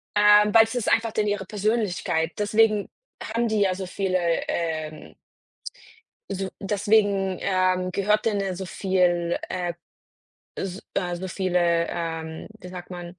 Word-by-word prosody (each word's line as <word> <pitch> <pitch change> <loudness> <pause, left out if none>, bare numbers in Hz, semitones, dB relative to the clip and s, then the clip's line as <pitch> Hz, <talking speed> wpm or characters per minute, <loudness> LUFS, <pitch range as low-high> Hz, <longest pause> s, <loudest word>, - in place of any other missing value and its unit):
äh, 210 0 +7
weil 225 - +9
es 225 - -7
ist 240 -3 0
einfach 225 0 +2
denen 210 -1 +1
ihre 205 -1 -2
Persönlichkeit. 200 -6 0
Deswegen 210 0 +2 0.3
haben 230 +2 -1
die 215 -2 +1
ja 190 -2 +3
so 190 -1 -5
viele, 185 0 -1 0.3
ähm 155 - -4 1.2
so 195 0 -3
deswegen, 200 -1 +2
ähm, 185 -1 +1
gehört 210 +3 +1
denen 210 -3 +1
ja 190 -2 -2
so 190 +1 -5
viel 175 -2 +1
äh, 175 -2 -2 0.8
s 190 +1 -5 0.3
so 185 +2 -5
viele 175 -3 +1
ähm, 165 -1 -4
wie 180 - -9
sagt 180 0 -9
man 175 0 -8
190 Hz, 140 wpm, -25 LUFS, 175-210 Hz, 1.2 s, weil